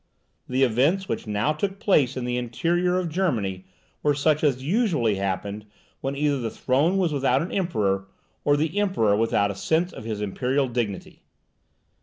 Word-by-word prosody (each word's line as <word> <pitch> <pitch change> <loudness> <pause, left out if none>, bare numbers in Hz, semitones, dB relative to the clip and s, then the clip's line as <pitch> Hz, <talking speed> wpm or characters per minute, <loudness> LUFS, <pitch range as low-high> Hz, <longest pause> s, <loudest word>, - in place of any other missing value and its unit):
The 130 +1 +2
events 140 - +2
which - - -3
now 105 +7 +1
took 195 +5 -3
place 140 - +2
in 125 - -3
the 125 0 -1
interior 170 +9 0
of 185 -1 -1
Germany 115 - -1 0.4
were 145 -1 +2
such 150 +2 +2
as 130 -4 +1
usually 160 - +1
happened 100 +2 -3 0.3
when 135 +1 -3
either 145 -1 +1
the 115 -2 -2
throne 145 - +1
was 175 -5 +1
without 140 +2 +2
an 175 - -6
emperor, 100 - 0 0.4
or 145 0 +3
the 160 +6 0
Emperor 185 - +2
without 105 -2 +1
a - - -7
sense 160 - 0
of - - -9
his 110 -2 -3
imperial 125 +7 0
dignity. 115 -6 -4
135 Hz, 170 wpm, -25 LUFS, 110-165 Hz, 0.4 s, or